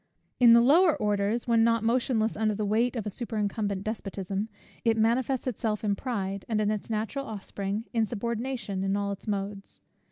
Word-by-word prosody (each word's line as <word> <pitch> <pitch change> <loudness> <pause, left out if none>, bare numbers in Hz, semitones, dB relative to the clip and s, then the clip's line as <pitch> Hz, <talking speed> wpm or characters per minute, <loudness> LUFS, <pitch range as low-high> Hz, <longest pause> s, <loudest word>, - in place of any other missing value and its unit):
In 240 -2 +8
the 235 - +7
lower 315 +6 +5
orders, 210 +3 0
when 230 -1 +4
not 230 -1 +2
motionless 230 -1 +1
under 215 0 +1
the 210 0 -2
weight 230 +5 +1
of 225 - -3
a 210 - -3
superincumbent 205 -3 -2
despotism, 200 -1 -3 0.3
it 225 -1 +2
manifests 240 +4 +1
itself 220 -4 -2
in 205 -1 +1
pride, 200 -5 -3
and 220 -2 +1
its 210 0 -1
natural 225 +6 -2
offspring, 200 0 -4
insubordination 230 -2 -2
in 195 +1 +1
all 200 0 -1
its 200 +3 -8
modes. 200 -1 -4
220 Hz, 165 wpm, -28 LUFS, 200-235 Hz, 0.3 s, In